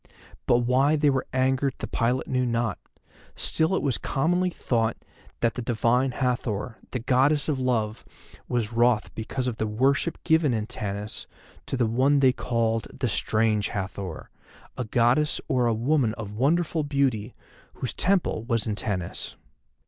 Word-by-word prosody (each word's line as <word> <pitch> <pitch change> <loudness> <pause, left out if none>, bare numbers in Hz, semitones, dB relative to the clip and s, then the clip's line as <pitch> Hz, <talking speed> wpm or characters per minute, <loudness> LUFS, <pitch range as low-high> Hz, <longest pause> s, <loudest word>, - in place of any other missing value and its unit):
But 120 0 +4
why 130 +5 +3
they 145 -1 +3
were 135 -1 -1
angered 130 +1 +1
the - - -4
pilot 125 +2 0
knew 130 -1 +1
not, 115 -3 -1 0.6
still 160 +4 +1
it - - -1
was 135 -3 0
commonly 175 +6 +1
thought 115 -9 -1 0.4
that 115 -1 +2
the - - -4
Divine 120 +2 +2
Hathor, 125 -3 -2
the - - -3
Goddess 135 +4 +2
of 145 -4 0
Love, 115 -4 -1 0.4
was 120 -2 -1
wroth 120 -1 +2
because 125 +3 -3
of 120 -3 -2
the 110 - -1
worship 135 +9 +1
given 160 -6 +3
in 110 -1 -2
Tanis 105 -3 -5 0.4
to 135 - -2
one 130 +6 +3
they 130 -2 +5
called 115 -3 -1
THE 130 -2 -2
STRANGE 110 0 +1
HATHOR, 95 -3 -5 0.4
a 125 - -3
goddess 120 +7 +2
or 125 -5 +2
a 115 - +2
woman 120 -1 +1
of 110 -3 -6
wonderful 155 +8 +1
beauty, 135 -6 0 0.4
whose 130 - -4
Temple 185 - +1
was 115 -3 0
in 110 - -1
Tanis. 100 -4 -3
125 Hz, 155 wpm, -26 LUFS, 110-135 Hz, 0.6 s, they